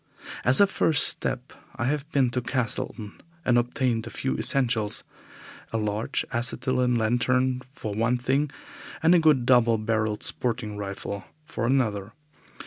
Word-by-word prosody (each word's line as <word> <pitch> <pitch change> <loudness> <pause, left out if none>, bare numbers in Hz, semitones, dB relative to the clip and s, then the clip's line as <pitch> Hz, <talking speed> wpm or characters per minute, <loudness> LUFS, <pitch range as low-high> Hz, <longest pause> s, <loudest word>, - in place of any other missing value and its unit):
As 130 +2 +4
a 200 - +8
first 165 -6 +2
step 130 0 -3 0.2
I 120 - -2
have 145 +3 -1
been 130 -4 +2
to 125 - -1
Castleton 115 -4 -3 0.2
and 120 - +3
obtained 120 -1 0
a - - -5
few 130 - -2
essentials 115 -6 +1 0.7
a 115 - -1
large 105 0 -1
acetylene 125 +1 +1
lantern 125 +3 +1
for 110 -6 -6
one 115 +4 +1
thing, 135 +4 0 0.5
and 165 +2 +6
a 175 - +6
good 150 -6 +4
double 120 -3 +4
barrelled 110 -1 -1
sporting 115 -3 -2
rifle 100 0 -5 0.2
for 115 - -3
another. 110 -6 0
120 Hz, 140 wpm, -26 LUFS, 110-130 Hz, 0.7 s, a